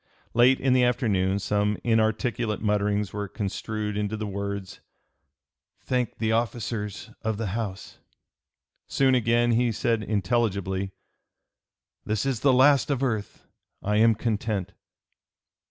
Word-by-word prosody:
Late 125 Hz, +3 st, +5 dB
in 130 Hz, -1 st, +2 dB
the 130 Hz, -1 st, +4 dB
afternoon 105 Hz, -6 st, +1 dB
some 105 Hz, +1 st, 0 dB
inarticulate 110 Hz, 0 st, +1 dB
mutterings 105 Hz, -1 st, 0 dB
were 105 Hz, 0 st, -3 dB
construed 105 Hz, +1 st, -4 dB
into 105 Hz, +1 st, -2 dB
the 110 Hz, -, -3 dB
words, 100 Hz, -1 st, -5 dB, 1.0 s
"Thank 125 Hz, -2 st, -1 dB
the 110 Hz, -1 st, 0 dB
officers 110 Hz, -2 st, -2 dB
of 110 Hz, -2 st, -2 dB
the 110 Hz, -2 st, -2 dB
House." 105 Hz, -4 st, -5 dB, 0.9 s
Soon 135 Hz, -1 st, +2 dB
again 120 Hz, -1 st, +3 dB
he 120 Hz, +1 st, +2 dB
said 115 Hz, +1 st, 0 dB
intelligibly, 100 Hz, -3 st, -1 dB, 1.1 s
"This 110 Hz, +3 st, -1 dB
is 135 Hz, -4 st, 0 dB
the 140 Hz, -, +4 dB
last 135 Hz, +2 st, +5 dB
of 140 Hz, -2 st, 0 dB
earth! 110 Hz, -6 st, -3 dB, 0.4 s
I 105 Hz, +1 st, +1 dB
am 115 Hz, +1 st, +5 dB
content!" 105 Hz, -3 st, -2 dB
110 Hz, 120 wpm, -26 LUFS, 105-120 Hz, 1.1 s, Late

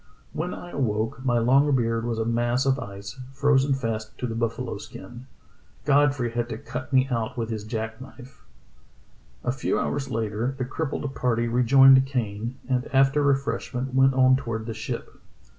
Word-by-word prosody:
When 175 Hz, +3 st, -3 dB
I 175 Hz, -, -8 dB
awoke 115 Hz, -1 st, -1 dB
my 120 Hz, -2 st, +2 dB
long 135 Hz, +5 st, +4 dB
beard 115 Hz, -2 st, 0 dB
was 115 Hz, -1 st, -2 dB
a 110 Hz, -, -1 dB
mass 120 Hz, +2 st, +1 dB
of 135 Hz, +1 st, +2 dB
ice, 100 Hz, +1 st, -8 dB
frozen 140 Hz, 0 st, +3 dB
fast 115 Hz, -4 st, -4 dB
to -, -, -4 dB
the 115 Hz, -, -3 dB
buffalo 115 Hz, 0 st, -3 dB
skin; 120 Hz, +6 st, -11 dB, 0.6 s
Godfrey 140 Hz, -4 st, +3 dB
had 120 Hz, 0 st, -2 dB
to 110 Hz, -, -4 dB
cut 125 Hz, +3 st, -7 dB
me 130 Hz, -1 st, +4 dB
out 115 Hz, +1 st, -2 dB
with 115 Hz, -1 st, -2 dB
his 110 Hz, -2 st, -4 dB
jack 110 Hz, +1 st, -5 dB
knife." 130 Hz, 0 st, -13 dB, 1.0 s
A 125 Hz, -, 0 dB
few 135 Hz, -, -1 dB
hours 140 Hz, -2 st, -2 dB
later 115 Hz, +2 st, -2 dB
the 130 Hz, -, -2 dB
crippled 145 Hz, 0 st, -3 dB
party 120 Hz, -1 st, 0 dB
rejoined 130 Hz, +3 st, +6 dB
Kane 115 Hz, -2 st, -3 dB
and 125 Hz, -1 st, 0 dB
after 135 Hz, +2 st, +4 dB
refreshment 130 Hz, -2 st, -1 dB
went 135 Hz, 0 st, +4 dB
on 130 Hz, 0 st, +5 dB
toward 115 Hz, -4 st, -4 dB
the 115 Hz, -, -4 dB
ship. 110 Hz, -, -6 dB
125 Hz, 170 wpm, -25 LUFS, 115-135 Hz, 1.0 s, rejoined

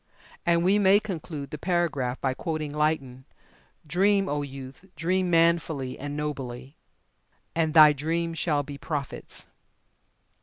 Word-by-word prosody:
And 170 Hz, 0 st, +3 dB
we 195 Hz, +3 st, +4 dB
may 200 Hz, 0 st, +6 dB
conclude 160 Hz, -8 st, -6 dB
the 150 Hz, -, -6 dB
paragraph 155 Hz, -8 st, 0 dB
by 130 Hz, -1 st, 0 dB
quoting 155 Hz, 0 st, -4 dB
Lytton: 140 Hz, -4 st, -1 dB, 0.6 s
"Dream, 195 Hz, +5 st, +2 dB
O 145 Hz, -2 st, -1 dB
youth, 135 Hz, +3 st, -9 dB
dream 180 Hz, +4 st, 0 dB
manfully 165 Hz, -6 st, +1 dB
and 145 Hz, +1 st, -5 dB
nobly, 135 Hz, -2 st, -5 dB, 0.8 s
and 160 Hz, -1 st, 0 dB
thy 155 Hz, -2 st, +9 dB
dreams 165 Hz, +3 st, -2 dB
shall 150 Hz, -4 st, +1 dB
be 140 Hz, 0 st, -9 dB
prophets." 145 Hz, -4 st, -5 dB
155 Hz, 125 wpm, -26 LUFS, 140-170 Hz, 0.8 s, thy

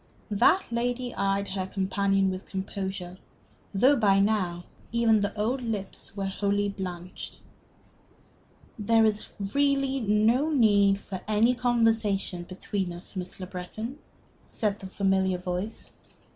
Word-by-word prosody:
That 285 Hz, -, +4 dB
lady 245 Hz, +1 st, -1 dB
eyed 200 Hz, 0 st, 0 dB
her 190 Hz, -1 st, -3 dB
companion 195 Hz, 0 st, +1 dB
with 185 Hz, +1 st, -6 dB
composure, 190 Hz, -1 st, -5 dB, 0.5 s
though 255 Hz, +8 st, +5 dB
by 200 Hz, -6 st, +4 dB
now 190 Hz, -4 st, +1 dB, 0.3 s
even 230 Hz, -2 st, +4 dB
the 200 Hz, 0 st, 0 dB
old 245 Hz, +5 st, 0 dB
lips 210 Hz, -3 st, -5 dB
were 195 Hz, -, -1 dB
wholly 200 Hz, +1 st, 0 dB
blanched. 180 Hz, -2 st, -7 dB, 1.4 s
"There 225 Hz, +1 st, +4 dB
is 215 Hz, -1 st, 0 dB, 0.3 s
really 275 Hz, -1 st, +2 dB
no 225 Hz, +6 st, +3 dB
need 205 Hz, -8 st, +4 dB
for 195 Hz, -2 st, -7 dB
any 215 Hz, +3 st, +4 dB
conversation 225 Hz, -7 st, +1 dB
between 185 Hz, 0 st, -3 dB
us, 175 Hz, +4 st, -9 dB
Miss 180 Hz, 0 st, -6 dB
Le 185 Hz, -, -4 dB
Breton," 215 Hz, +9 st, -6 dB, 0.5 s
said 210 Hz, -2 st, -1 dB
the 190 Hz, -, -7 dB
familiar 190 Hz, -1 st, +1 dB
voice. 180 Hz, +4 st, -5 dB
200 Hz, 125 wpm, -27 LUFS, 190-230 Hz, 1.4 s, though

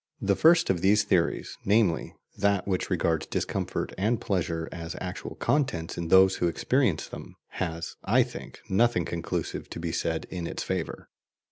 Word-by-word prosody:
The 100 Hz, 0 st, +2 dB
first 165 Hz, -, +5 dB
of 90 Hz, -3 st, -1 dB
these 100 Hz, +2 st, +4 dB
theories, 90 Hz, -4 st, 0 dB
namely, 100 Hz, -5 st, +2 dB, 0.2 s
that 100 Hz, -1 st, +1 dB
which 95 Hz, -2 st, -1 dB
regards 80 Hz, -3 st, 0 dB
discomfort -, -, -2 dB
and 110 Hz, +3 st, +1 dB
pleasure 85 Hz, -4 st, -1 dB
as 85 Hz, 0 st, -6 dB
actual 90 Hz, 0 st, -6 dB
contents 90 Hz, -, 0 dB
in 85 Hz, -, -3 dB
those 95 Hz, +2 st, +6 dB
who 90 Hz, -, +1 dB
experience 115 Hz, -, +1 dB
them, -, -, -10 dB
has, 80 Hz, 0 st, -4 dB
I -, -, +4 dB
think, -, -, -10 dB
nothing 95 Hz, -3 st, +2 dB
conclusive 85 Hz, -1 st, -4 dB
to -, -, -6 dB
be 85 Hz, 0 st, -3 dB
said 80 Hz, 0 st, -1 dB
in 85 Hz, -2 st, -4 dB
its -, -, -4 dB
favour. -, -, -4 dB
90 Hz, 160 wpm, -27 LUFS, 85-100 Hz, 0.2 s, those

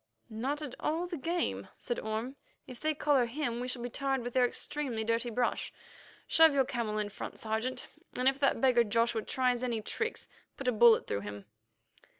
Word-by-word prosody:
"Not 270 Hz, +7 st, -2 dB
at 275 Hz, -5 st, -6 dB
all 325 Hz, +3 st, -1 dB
the 350 Hz, -1 st, -5 dB
game," 335 Hz, +4 st, -2 dB
said 240 Hz, -, -3 dB
Orme. 220 Hz, +5 st, -3 dB, 0.3 s
"If 250 Hz, -2 st, -10 dB
they 310 Hz, 0 st, 0 dB
collar 280 Hz, -5 st, +3 dB
him, 240 Hz, -2 st, -2 dB
we 250 Hz, -, -3 dB
shall 250 Hz, -1 st, -2 dB
be 245 Hz, -, -3 dB
tarred 270 Hz, -2 st, -1 dB
with 245 Hz, 0 st, -5 dB
their 250 Hz, -1 st, +4 dB
extremely 250 Hz, -3 st, -3 dB
dirty 230 Hz, +2 st, +1 dB
brush. 240 Hz, +1 st, -1 dB, 0.5 s
Shove 320 Hz, -2 st, +6 dB
your 270 Hz, -1 st, +4 dB
camel 230 Hz, -4 st, -2 dB
in 210 Hz, -1 st, -1 dB
front, -, -, -7 dB
Sergeant, 225 Hz, +4 st, -2 dB, 0.3 s
and 250 Hz, +1 st, +1 dB
if 270 Hz, 0 st, +3 dB
that 275 Hz, -, +2 dB
beggar 250 Hz, -3 st, +5 dB
Joshua 230 Hz, +1 st, +1 dB
tries 250 Hz, +1 st, 0 dB
any 240 Hz, -3 st, -1 dB
tricks, 450 Hz, -, -3 dB, 0.3 s
put 270 Hz, -, -5 dB
a -, -, +5 dB
bullet 230 Hz, 0 st, +6 dB
through 100 Hz, -, -2 dB
him." 105 Hz, 0 st, -7 dB
245 Hz, 190 wpm, -31 LUFS, 230-275 Hz, 0.5 s, Shove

